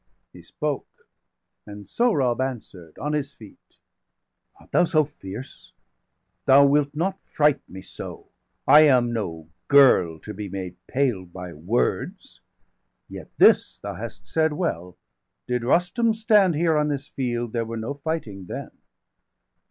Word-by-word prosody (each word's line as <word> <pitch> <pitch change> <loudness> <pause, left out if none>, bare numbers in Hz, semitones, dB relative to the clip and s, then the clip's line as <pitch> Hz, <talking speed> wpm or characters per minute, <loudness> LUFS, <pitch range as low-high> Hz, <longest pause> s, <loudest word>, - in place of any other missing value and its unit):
He 90 - -13
spoke; 150 - -5 0.6
and 105 -1 -10
Sohrab 135 - +1
answer'd, 105 -11 -6
on 150 +2 -3
his 145 -1 -2
feet: 110 -3 -17 0.8
"Art - - -21
thou - - +4
so 160 -3 +3
fierce? 125 -4 -10 0.7
Thou 140 +1 +7
wilt 145 0 +2
not 190 +5 -1
fright 150 -2 +1
me 95 - -9
so°! - - -8
°380 - - -24 0.4
I 150 - +9
am 125 -4 +3
no 80 -8 -5 0.2
girl 125 - +5
to 105 - -8
be 100 0 -6
made 95 -2 -6
pale 125 -8 0
by 90 0 -9
words. 90 +11 -2 0.7
Yet - - -9
this - - +5
thou - - -6
hast - - -9
said 160 -1 +1
well, 90 - -3 0.5
did 125 -1 -2
Rustum 180 - +2
stand 210 -6 +3
Here 165 +1 +2
on 150 0 +1
this 145 -2 -3
field, 120 -3 -3
there 115 -1 0
were 115 +1 -6
no 115 +5 -4
fighting 140 - -5
then. - - -7
130 Hz, 145 wpm, -24 LUFS, 100-150 Hz, 0.8 s, I